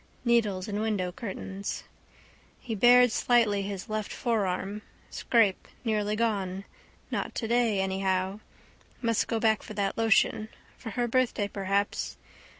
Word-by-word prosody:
Needles 215 -6 +2
in 205 0 -2
window 205 -5 -1
curtains. 195 -1 -5 0.8
He 235 - -5
bared 245 +3 +6
slightly 220 -4 +3
his 195 -1 -5
left 215 -1 -3
forearm. 205 -3 -1 0.3
Scrape: 220 -5 +2 0.2
nearly 210 -2 0
gone. 200 -4 -1 0.5
Not - - -3
today 230 -3 +1
anyhow. 190 0 -1 0.6
Must 230 -3 +1
go 225 - -1
back 220 -1 +2
for 215 - -9
that 200 +2 -1
lotion. 220 -1 +3 0.3
For 230 - -8
her 240 +3 -1
birthday 235 -4 +1
perhaps. 200 0 -1
210 Hz, 125 wpm, -28 LUFS, 195-230 Hz, 0.8 s, bared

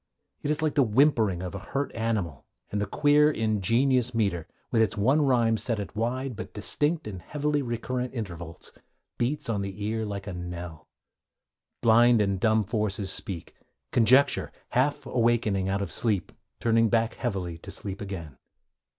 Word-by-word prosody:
It 145 - -3
is 155 +1 0
like 155 - +1
the 145 - +4
whimpering 110 - +3
of 90 - -5
a 100 - -5
hurt 135 +7 -3
animal, 105 - -2 0.2
and 105 - -1
the 100 - -1
queer, 150 +6 +4
ingenious 115 +2 +1
metre, 100 -7 0 0.2
with 115 - +3
its 110 -1 +1
one 130 +9 +3
rhyme 120 -5 +3
set 115 -1 -1
at 100 - -6
wide 125 +3 -2
but - - -8
distinct 150 +9 0
and 95 -4 -6
heavily 150 - -1
recurrent 125 +1 -3
intervals, 85 -7 -7 0.5
beats 130 +5 -1
on 105 -4 -1
the 100 +1 -5
ear 110 +1 -1
like 100 -2 -5
a 100 - -5
knell. 90 -2 -7 1.0
Blind 120 +1 +6
and 100 -2 +1
dumb 110 +1 +3
forces 105 -2 -2
speak, 85 -4 -5 0.4
conjecture, 130 +5 +4 0.2
half 145 +3 +1
awakening 115 -5 +1
out 100 +1 0
of 90 - -6
sleep, 105 -1 0 0.3
turning 115 -1 +3
back 115 0 +2
heavily 95 -8 -3
to - - -11
sleep 100 0 -6
again. 85 -9 -7
110 Hz, 160 wpm, -27 LUFS, 100-125 Hz, 1.0 s, Blind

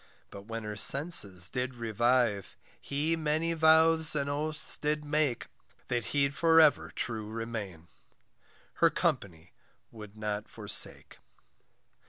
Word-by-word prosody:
But 100 +1 -12
when 115 0 -6
her 105 0 -6
senses 105 - +3
did 125 0 -4
revive, 115 -2 -1 0.2
He 150 +4 -2
many 160 +1 -1
vows 160 0 +4
and 140 -1 -2
oaths 155 +2 -2
did 150 0 -2
make, 150 -4 -1 0.4
That 120 -2 -2
he'd 140 -1 0
for 165 +2 +3
ever 155 -2 +3
true 110 -3 -4
remain, 110 -7 -7 0.9
Her - - +6
company 85 -3 -3 0.4
would 105 -2 -13
not 105 0 -5
forsake. - - -1
125 Hz, 120 wpm, -29 LUFS, 105-155 Hz, 0.9 s, Her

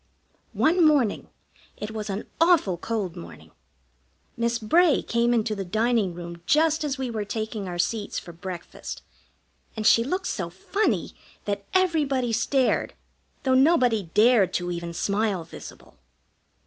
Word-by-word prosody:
One 340 +2 +3
morning, 290 -9 +2 0.5
it 210 +1 -5
was 215 -1 -5
an 195 +2 -4 0.2
awful 330 - +4
cold 195 -1 -3
morning, 175 - -11 0.8
Miss 235 0 0
Bray 305 +8 +3
came 235 +1 +1
into 225 -2 +1
the 200 -2 -4
dining 215 -1 0
room 170 -1 -8
just 315 0 +3
as 290 -2 -2
we 260 -2 -3
were 215 -2 -2
taking 215 -1 -4
our 175 -1 -5
seats 205 +4 -1
for 175 - -6
breakfast, 175 0 -8 0.7
and 215 - -3
she 230 - +6
looked 365 +9 -2
so 180 - -3
funny 395 - -1 0.3
that 200 -1 -3
everybody 290 -10 +1
stared, 255 +3 +1 0.5
though 260 -1 +2
nobody 255 - +3
dared 215 -2 +4
to 175 0 -1
even 170 -1 -4
smile 200 +1 -1
visible. 165 - -12
220 Hz, 140 wpm, -25 LUFS, 195-265 Hz, 0.8 s, she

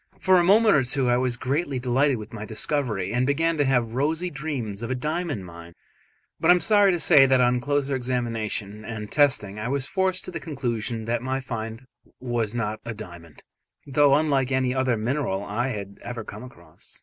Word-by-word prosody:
For 185 -1 +4
a - - +3
moment 215 +4 +5
or 145 - +4
two 130 0 0
I 120 - +3
was 125 -1 0
greatly 140 +2 -1
delighted 130 +2 +1
with 110 +2 -10
my 110 -2 -6
discovery, 110 -3 -2
and 125 +2 +1
began 165 +4 +1
to 145 - +2
have 120 -4 +1
rosy 160 +7 -1
dreams 135 -8 -4
of 115 - -4
a 130 - -1
diamond 150 - -3
mine; 85 0 -12 0.6
but - - +1
I 180 - +9
am - - +1
sorry 205 +2 +4
to 175 - -1
say 145 -5 +6
that 130 -1 +4
on 125 0 +3
closer 140 +1 0
examination 115 -4 -3
and 110 -1 -7
testing 130 -9 +2
I 105 - -3
was 135 +1 0
forced 190 +3 -1
to - - -6
the - - -5
conclusion 120 -7 -3
that 115 +1 -1
my 130 +1 -2
find 115 -1 -6 0.3
was 120 -3 -2
not 110 -2 -2
a 115 -1 -6
diamond, 85 -6 -11 0.4
though 140 0 +4
unlike 140 -3 +1
any 130 -1 +1
other 130 -3 +1
mineral 110 -4 -1
I 105 +5 -2
had 100 -5 -6
ever 120 -2 -6
come 105 0 -9
across. 85 -10 -13
125 Hz, 200 wpm, -25 LUFS, 110-145 Hz, 0.6 s, I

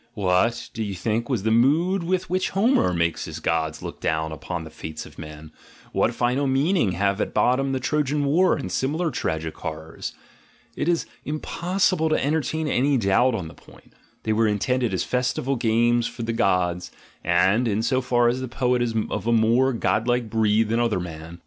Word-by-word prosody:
What, 100 +4 +1
do 115 - -5
you 100 -3 -3
think, 110 +6 -2
was 120 -8 -1
the 110 - +1
mood 155 +11 +3
with 185 +2 -1
which 185 +1 0
Homer 215 - +3
makes 85 -1 0
his 80 0 -7
gods 80 -1 -1
look - - -7
down 80 0 -1
upon 85 +2 -5
the 80 - -10
fates 80 0 -7
of - - -14
men? 75 0 -9 0.4
What - - +1
final 125 +4 +1
meaning 135 - +2
have 100 +3 0
at - - -3
bottom 130 +5 +2
the 130 - -1
Trojan 145 +1 0
War 170 +7 +3
and 140 - -5
similar 155 +5 -1
tragic 80 0 -3
horrors? 80 +1 -6 0.6
It 145 - -2
is 170 -1 +1 0.2
impossible 170 +2 0
to 155 - +1
entertain 155 +1 -1
any 140 0 +2
doubt 115 +4 +3
on 90 -7 -4
the - - -11
point: - - -19 0.3
they 110 - 0
were 110 +1 +2
intended 120 +3 0
as 95 - -1
festival 125 +2 -1
games 120 0 +2
for 115 - -7
the 115 0 -2
gods, 90 -4 +1 0.3
and, 95 +8 +3
in 110 0 0
so 130 +2 +1
far 120 -1 +2
as 125 +2 0
the 130 - -3
poet 125 0 0
is 115 -2 -1 0.2
of 105 +1 -3
a - - +3
more 115 +4 +3
godlike 115 0 0
breed 110 0 +2
than 115 +1 +1
other 115 -5 +1
men. 80 -1 -8
115 Hz, 190 wpm, -24 LUFS, 95-135 Hz, 0.6 s, mood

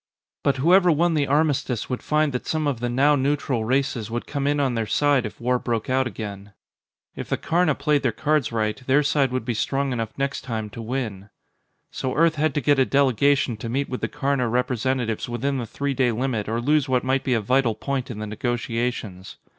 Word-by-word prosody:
But 140 -2 +1
whoever 175 +6 +5
won 165 +2 +2
the 145 -3 +1
armistice 140 -5 +1
would 125 - -3
find 150 -2 +1
that 125 - -4
some 155 -1 0
of 140 -5 -1
the 120 0 -2
now 140 +4 +4
neutral 135 -4 0
races 130 -3 0
would 120 +1 -3
come 140 -1 -2
in 145 0 +1
on 135 -3 +1
their 115 -2 -1
side 140 -3 +2
if - - -12
war 125 +1 +1
broke 115 0 -2
out 130 -1 +2
again. 100 -2 -7 0.6
If - - -7
the - - 0
Karna 165 -3 +1
played 150 -1 +1
their 125 - +1
cards 150 +3 0
right, 110 -2 0
their 140 +3 +4
side 140 -2 +2
would 130 -2 -2
be 120 - -1
strong 135 +4 -1
enough 115 -3 -2
next 135 0 -2
time 110 -4 -4
to 115 - -7
win. 110 -5 -4 0.6
So 130 - -3
Earth 165 +1 +4
had 155 -1 0
to 145 - +1
get 145 +2 +3
a - - +6
delegation 140 -2 +2
to 115 +1 -6
meet 135 +4 -1
with 125 - -4
the - - 0
Karna 140 -4 -1
representatives 125 -1 -1
within 135 +3 -1
the 120 - -4
three 140 +5 -2
day 130 -2 +2
limit 115 -3 -2
or 115 +1 -1
lose 145 +1 +2
what 125 -1 +2
might 130 +1 0
be 130 - +1
a - - +2
vital 120 +1 +1
point 135 +1 -3
in 120 - -6
the 105 - -4
negotiations. 115 -3 -3
130 Hz, 220 wpm, -23 LUFS, 115-140 Hz, 0.6 s, a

